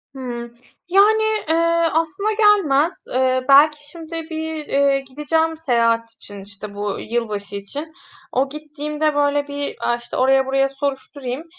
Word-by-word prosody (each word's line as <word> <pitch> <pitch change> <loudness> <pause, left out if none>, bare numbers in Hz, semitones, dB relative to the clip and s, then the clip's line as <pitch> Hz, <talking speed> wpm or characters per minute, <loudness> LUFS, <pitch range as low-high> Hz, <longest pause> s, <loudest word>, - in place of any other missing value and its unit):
Hımm. 240 -2 -6 0.3
Yani, 415 +4 +5 0.3
eee, 320 - +3 0.4
aslında 330 +7 0
gelmez. 375 -8 +4
Eee, 255 0 +1
belki 295 +1 +5
şimdi 330 -1 -11 0.2
bir, 320 -1 -4
eee, 275 0 +3
gideceğim 300 +4 -1
seyahat 230 -6 +1
için, 205 -2 -9
işte, 200 +1 -8
bu 205 -1 -3
yılbaşı 215 -3 -3
için. 285 +11 -6 0.4
O 270 +2 +1
gittiğimde, 300 0 -3
böyle, 290 0 +1
bir, 285 0 -4
aaa, 240 - +1
işte, 240 0 -7
oraya 265 +1 +4
buraya 270 +1 +1
soruşturayım, 275 0 -4
280 Hz, 135 wpm, -20 LUFS, 245-315 Hz, 0.4 s, Yani